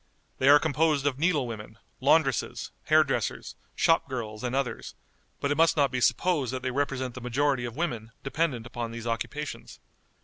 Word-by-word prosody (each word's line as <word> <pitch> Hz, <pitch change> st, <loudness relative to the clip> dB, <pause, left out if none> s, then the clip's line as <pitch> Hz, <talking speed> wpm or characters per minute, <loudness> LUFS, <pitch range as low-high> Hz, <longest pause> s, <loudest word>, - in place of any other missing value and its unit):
They 130 Hz, -, +4 dB
are 145 Hz, -, +10 dB
composed 150 Hz, -1 st, +1 dB
of 140 Hz, -2 st, 0 dB
needle 160 Hz, -5 st, +2 dB
women, 110 Hz, -3 st, -8 dB, 0.2 s
laundresses, -, -, +1 dB
hair -, -, +6 dB
dressers, -, -, -3 dB, 0.2 s
shop 165 Hz, -3 st, +3 dB
girls, 110 Hz, -3 st, -5 dB
and 125 Hz, +1 st, -2 dB
others, 135 Hz, -2 st, -3 dB, 0.4 s
but 140 Hz, -, -1 dB
it 145 Hz, -, 0 dB
must 165 Hz, 0 st, +4 dB
not 140 Hz, -2 st, +3 dB
be 125 Hz, -1 st, -2 dB
supposed 135 Hz, +2 st, +2 dB
that 130 Hz, -1 st, -4 dB
they 130 Hz, -, -1 dB
represent 130 Hz, -2 st, -2 dB
the 130 Hz, -, -8 dB
majority 130 Hz, +1 st, 0 dB
of 120 Hz, -1 st, -6 dB
women 120 Hz, -9 st, -3 dB
dependent 135 Hz, -4 st, -1 dB
upon 120 Hz, -1 st, -5 dB
those 115 Hz, 0 st, -7 dB
occupations. 130 Hz, +6 st, -4 dB
130 Hz, 175 wpm, -27 LUFS, 120-145 Hz, 0.4 s, are